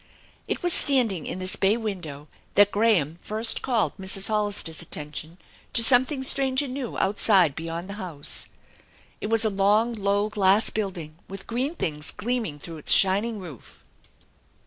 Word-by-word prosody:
It - - -3
was 350 -1 +2
standing 235 - +4
in - - -4
this 185 0 -2
bay 200 +4 +1
window 175 -10 -6 0.3
that 205 0 +5
Graham 190 -8 +1
first 220 +2 0
called 235 -5 0
Mrs. 190 +1 0
Hoilister's 205 -6 -1
attention 155 +1 -5 0.4
to 230 - +5
something 260 +3 +3
strange 265 0 +3
and 260 -3 -6
new 260 -3 -5
outside/ 190 -6 +2
behind 165 +2 -6
the 200 - -7
house. 160 -6 -3 0.8
It - - -3
was 225 0 +2
a 215 - +1
long, 205 +4 +2
low 205 -1 0
glass 210 0 +2
building 175 -7 -5
with 195 0 -9
green 260 +7 -3
things 150 - -4
gleaming 225 -8 -3
through 165 +3 -9
its 150 - -1
shining 205 +4 +4
roof. 170 - -12
200 Hz, 155 wpm, -24 LUFS, 170-230 Hz, 0.8 s, that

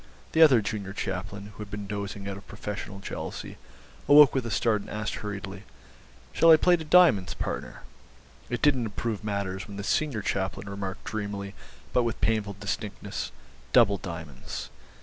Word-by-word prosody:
The 160 - +3
other 135 -8 +8
junior 100 -2 -4
chaplain, 100 +1 -4
who - - -19
had 105 -1 -6
been 105 -1 -5
dozing 100 0 -5
out 100 - -3
of 100 0 -12
professional 105 -1 -6
jealousy, - - -6 0.5
awoke 145 -1 +9
with 130 -3 -1
a - - -3
start 110 -1 +2
and - - -11
asked 105 0 -3
hurriedly, 100 -2 -6 0.7
'Shall 165 - +5
I 160 - +10
play 180 +3 +5
to 165 - -5
diamonds, 150 - +5
partner?' - - -5 0.7
It 120 - -3
didn't 135 -5 +4
improve 110 0 -3
matters 100 -2 -3
when 100 -2 -8
the 100 - -4
senior 120 -1 0
chaplain 95 +1 -2
remarked 100 -1 -5
dreamily 100 -2 -4 0.4
but 125 - +4
with 115 -1 -2
painful 105 -3 0
distinctness, 105 0 -4 0.4
'Double 100 -6 +5
diamonds. 80 -6 -7
105 Hz, 165 wpm, -27 LUFS, 100-115 Hz, 0.7 s, I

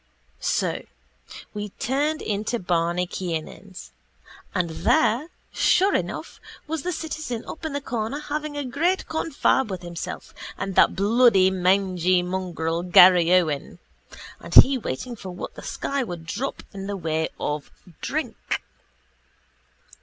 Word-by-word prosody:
So - - 0 0.7
we 210 0 -4
turned 290 +9 -1
into 215 +3 -1
Barney 175 -2 0
Kiernan's 180 +2 -6 0.6
and 175 -3 0
there, 295 - +2 0.3
sure 390 +2 +3
enough, - - -3 0.3
was 315 0 -3
the 360 - -2
citizen 310 -8 -4
up 320 - -8
in 315 - -3
the 285 - -2
corner 235 +1 -3
having 300 0 -4
a 290 - -2
great 330 +9 0
confab 295 -5 +1
with 185 -2 -5
himself 170 -1 -6 0.2
and 195 - -3
that - - +5
bloody 200 -2 +4
mangy 185 -1 +2
mongrel, 175 -3 -2
Garryowen, 175 -4 +5 0.6
and - - -7
he 270 +1 +9
waiting 240 - -4
for 195 -4 -9
what 180 - -7
the - - -10
sky 280 0 -2
would 175 -7 -7
drop 240 +11 -4
in 195 0 -6
the 200 -1 -3
way 160 -2 -1
of 150 0 -3 0.3
drink. 310 +3 -3
200 Hz, 130 wpm, -24 LUFS, 180-275 Hz, 0.7 s, he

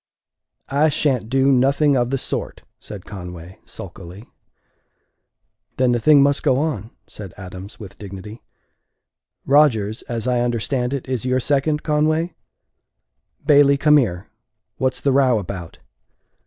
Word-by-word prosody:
"I 150 +3 +3
sha'n't 130 -6 0
do 135 +1 +3
nothing 140 +3 +3
of 120 -1 +1
the 135 - 0
sort," - - -4 0.2
said 100 -4 -10
Conway, 90 -2 -9
sulkily. 90 +6 -10 1.5
"Then 130 -1 +3
the 120 - +1
thing 145 +2 +5
must 140 0 +2
go 130 - +2
on," 135 -8 -2 0.2
said 100 -4 -10
Adams, 95 +1 -9
with 100 -3 -11
dignity. 100 +2 -9 1.0
"Rodgers, 120 -7 +3
as 115 -2 -3
I 125 -1 +1
understand 120 +1 -1
it, 140 -2 -4
is 130 -3 -2
your 130 0 +1
second, 150 +3 0
Conway? 155 +2 +1 1.1
Bailey, 140 -1 +5
come 150 +1 +5
here. 95 -8 -1 0.5
What's 130 -1 -1
the 140 - +2
row 130 -3 +3
about?" 90 -4 -6
125 Hz, 130 wpm, -21 LUFS, 105-140 Hz, 1.5 s, thing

